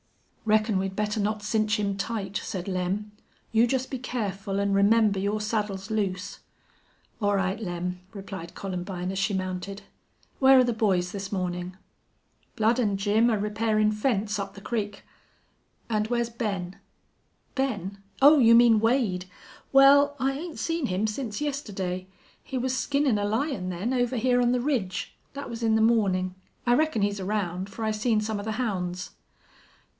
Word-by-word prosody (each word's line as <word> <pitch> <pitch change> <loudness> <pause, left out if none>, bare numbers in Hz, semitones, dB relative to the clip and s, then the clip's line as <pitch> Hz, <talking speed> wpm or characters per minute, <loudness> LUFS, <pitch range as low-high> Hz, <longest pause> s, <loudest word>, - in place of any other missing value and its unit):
"Reckon 215 -2 +3
we'd 190 0 -3
better 210 +1 -1
not 210 +1 -1
cinch 215 0 +1
him 200 -1 0
tight," 200 -1 -4
said 185 -1 -5
Lem. 190 +3 -2 0.4
"You 230 +2 +4
jest 260 +1 -1
be 260 - -3
careful 200 -5 -3
an' 200 0 +1
remember 205 0 +4
your 205 +2 0
saddle's 210 -2 -2
loose." 200 -3 -2 0.8
"All 205 -1 +2
right, 190 +1 0
Lem," 180 -2 -4
replied 195 -4 -8
Columbine, 180 -1 -4
as 190 - -3
she 195 0 +1
mounted. 185 +1 -4 0.6
"Where 265 0 +7
are 255 - +7
the 240 -1 0
boys 190 -5 +1
this 195 -1 -5
morning?" 180 -1 -3 0.8
"Blud 225 +3 +2
an' 205 -5 +1
Jim 210 +4 +3
air 220 -3 +1
repairin' 215 0 +1
fence 210 -2 0
up 200 0 -5
the - - -9
crick." 205 -2 -3 0.8
"And 215 -1 0
where's 235 0 -1
Ben?" 195 -6 -3 0.8
"Ben? 205 -8 -2 0.2
Oh, 290 +2 +8
you 230 -2 +7
mean 235 -2 +6
Wade. 225 -6 +1 0.4
Wal, 280 +1 +6
I 265 +1 +2
'ain't 320 +4 -6
seen 330 -5 -1
him 185 +3 0
since 215 0 -3
yestidday. 195 -11 -3 0.4
He 265 - -4
was 255 +1 0
skinnin' 280 -5 +1
a - - -1
lion 220 -3 -1
then, 190 +8 -2
over 245 0 0
hyar 245 +1 +3
on 240 0 +3
the 250 - +2
ridge. 240 -10 -2 0.2
Thet 280 - -6
was 235 0 -6
in 220 -1 +3
the 220 - +3
mawnin'. 195 -5 +2 0.3
I 240 - +4
reckon 300 -6 +2
he's 205 0 0
around, 190 -1 -2
fer 210 +3 -6
I 220 - +1
seen 215 +1 +1
some 215 -1 -2
of 205 - -6
the 220 - -2
hounds." 185 -6 -3
210 Hz, 165 wpm, -27 LUFS, 195-235 Hz, 0.8 s, Oh